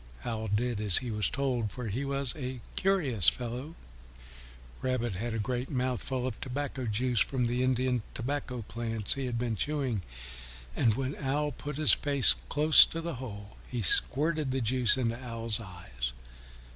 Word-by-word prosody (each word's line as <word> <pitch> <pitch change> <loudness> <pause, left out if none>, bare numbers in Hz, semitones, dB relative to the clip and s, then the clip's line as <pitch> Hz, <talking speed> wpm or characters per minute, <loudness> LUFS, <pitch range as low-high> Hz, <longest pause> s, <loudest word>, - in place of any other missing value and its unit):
Owl 110 -2 -2
did 110 +2 0
as 100 -5 +2
he 125 -2 -1
was 105 -1 0
told, 130 -6 -1
for 125 -2 -6
he 115 +6 -2
was 140 -2 -1
a 130 -3 -5 0.2
curious 150 - +5
fellow. 125 +6 -6 1.1
Rabbit 125 -4 -1
had 115 +5 -3
a - - -1
great 125 +4 -2
mouthful 130 -1 -1
of 125 -4 -4
tobacco 135 -1 -3
juice 120 +2 +1
from 130 -3 +1
the 120 +1 0
Indian 130 -1 +1
tobacco 125 -2 -3
leaves 115 -3 -1
he 135 -2 -3
had 120 -1 -2
been 115 -1 -1
chewing, 135 -3 -1 0.7
and 110 -3 +3
when 135 +2 -2
Owl 145 +2 0
put 145 +2 -6
his 155 -1 +5
face 140 -3 +3 0.2
close 150 +1 +7
to 165 - -5
the 170 0 -3
hole 105 -5 -8
he 120 -3 -2
squirted 150 - +3
the 130 +1 0
juice 125 0 +3
into 120 0 -1
Owl's 115 -2 -2
eyes. 85 - -5
125 Hz, 165 wpm, -30 LUFS, 115-135 Hz, 1.1 s, close